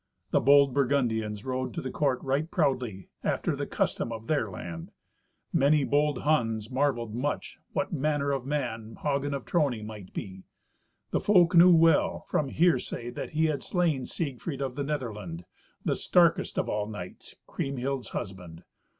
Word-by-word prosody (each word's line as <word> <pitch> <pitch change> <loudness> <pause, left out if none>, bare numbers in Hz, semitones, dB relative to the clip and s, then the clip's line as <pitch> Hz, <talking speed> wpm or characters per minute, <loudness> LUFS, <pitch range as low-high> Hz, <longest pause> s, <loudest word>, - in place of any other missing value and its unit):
The - - +3
bold 140 0 +6
Burgundians 115 -6 0
rode 130 -1 -3
to - - -2
the 130 - -4
court 135 -4 0
right 140 +4 0
proudly, 125 - -1
after - - 0
the - - -4
custom 115 - -1
of 115 -1 -6
their 145 -7 0
land. 85 -3 -7 0.6
Many 145 +1 +4
bold 145 0 +1
Huns 115 -7 +1
marvelled 130 -5 0
much 135 +5 -3
what 190 -1 -1
manner 145 -1 0
of 135 -2 -1
man 120 -6 -3
Hagen 140 -1 0
of 135 - -6
Trony 135 -10 0
might 105 -4 -9
be. 95 -1 -6 0.7
The - - +2
folk 180 -4 +4
knew 175 +1 +8
well, 165 -2 +4
from 145 -3 0
hearsay, 145 -7 +1
that 120 - -6
he 160 +1 +2
had 155 -3 0
slain 165 -8 0
Siegfried 140 -1 -4
of 135 -2 -2
the 140 +2 -3
Netherland, 105 - -4 0.4
the - - +2
starkest - - +2
of - - 0
all 105 0 -1
knights, 105 -5 -8
Kriemhild's 135 -3 -3
husband. 90 -3 -7
135 Hz, 160 wpm, -28 LUFS, 110-145 Hz, 0.7 s, knew